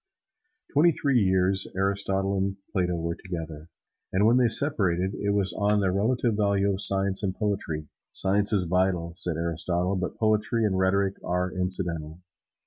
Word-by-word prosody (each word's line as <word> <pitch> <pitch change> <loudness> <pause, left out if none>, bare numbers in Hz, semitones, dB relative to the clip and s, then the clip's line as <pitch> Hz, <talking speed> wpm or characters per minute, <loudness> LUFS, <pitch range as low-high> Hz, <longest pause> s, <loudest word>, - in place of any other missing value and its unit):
Twenty 160 +4 +4
three 140 -4 +1
years 95 -1 +1
Aristotle 95 0 -1
and 95 0 -1 0.2
Plato 90 -2 0
were 85 0 -3
together, 80 -3 -8 0.4
and 95 +3 +2
when 115 +3 +4
they 125 -2 +4
separated 100 - +2
it 100 0 -3
was 100 -2 +1
on 105 0 +1
the 95 -2 +1
relative 115 +4 0
value 100 -1 +1
of 95 - -1
science 95 -1 +4
and 95 -3 -2
poetry. 95 -8 -3 0.2
"Science 100 +2 +2
is 100 -4 +3
vital," 90 -1 0
said 85 -2 0
Aristotle; 85 +3 -1
"but 90 -1 -4
poetry 110 +1 +1
and 100 -3 0
rhetoric 95 +1 +1
are 90 +1 -2
incidental." 85 -4 -2
95 Hz, 155 wpm, -26 LUFS, 90-100 Hz, 0.4 s, Twenty